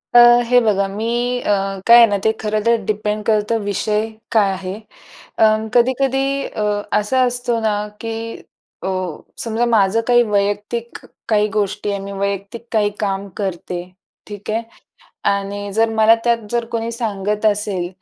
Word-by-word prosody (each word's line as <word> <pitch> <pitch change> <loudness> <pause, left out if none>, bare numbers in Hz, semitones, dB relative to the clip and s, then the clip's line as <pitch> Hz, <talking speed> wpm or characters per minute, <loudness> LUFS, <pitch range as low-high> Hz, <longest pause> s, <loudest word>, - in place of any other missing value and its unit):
अ, - - +10 0.3
हे 245 +1 +5
बघा 200 -3 +1
मी 210 +3 -4 0.3
अ, - - -4 0.4
काय 235 +1 +9
आहे 235 - +9
ना, 205 -1 0
ते 220 - +4
खरं 215 0 0
तर 235 0 +5
डिपेंड 210 0 -2
करतं 215 +1 +1
विषय 210 +2 0 0.3
काय 205 -3 +3
आहे? 185 0 -5 0.6
अं, 215 0 +3
कधी-कधी 270 +2 +1
अ, 215 - -5 0.4
असा 255 +5 +1
असतो 245 -1 -1
ना, 215 -1 +1 0.3
की 225 0 -4 0.7
अ, - - -2 0.6
समजा 230 +1 0
माझं 225 -2 +3
काही 240 -1 +5
वैयक्तिक 205 +3 -1 0.3
काही 210 -1 +3
गोष्टी 205 0 -1
आहे, 200 - -2
मी 200 +1 -7
वैयक्तिक 200 +4 -4
काही 210 -2 +2
काम 200 -1 -2
करते, 180 -3 -4 0.4
ठीक 205 0 -7
आहे. 225 +2 0 0.7
आणि 200 0 -3
जर 225 +1 +2
मला 220 0 +5
त्यात 235 -1 +3
जर 235 -1 0
कोणी 230 0 -2
सांगत 210 -2 -2
असेल, 205 -4 0
215 Hz, 155 wpm, -19 LUFS, 200-230 Hz, 0.7 s, अ